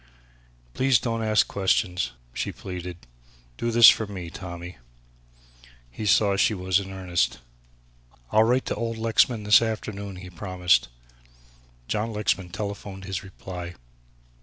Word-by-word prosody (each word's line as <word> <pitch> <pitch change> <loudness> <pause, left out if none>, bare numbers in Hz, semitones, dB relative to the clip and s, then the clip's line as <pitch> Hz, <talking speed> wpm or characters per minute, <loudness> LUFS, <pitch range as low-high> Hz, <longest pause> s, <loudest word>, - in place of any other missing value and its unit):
"Please 130 -2 +3
don't 115 0 -2
ask 110 -1 +3
questions," 90 -2 0 0.2
she - - -3
pleaded, 90 -2 -7 0.6
"do 120 - -2
this 115 -1 +8
for 110 - +6
me, 90 -4 -7
Tommy." 90 -4 -8 1.1
He 105 - -5
saw 100 0 +4
she 105 +2 +2
was 95 0 +1
in 95 -1 -7
earnest. 90 -3 -1 0.9
"I'll 110 +1 +5
write 125 +3 +2
to - - -2
old 115 +1 -3
Lexman 115 0 +2
this 105 +1 +6
afternoon," 105 -3 -4
he 90 0 -10
promised. 90 - +1 1.0
John 110 +2 -1
Lexman 100 -3 -1
telephoned 100 0 -6
his 95 -2 -4
reply. 90 -2 -8
100 Hz, 130 wpm, -25 LUFS, 90-110 Hz, 1.1 s, this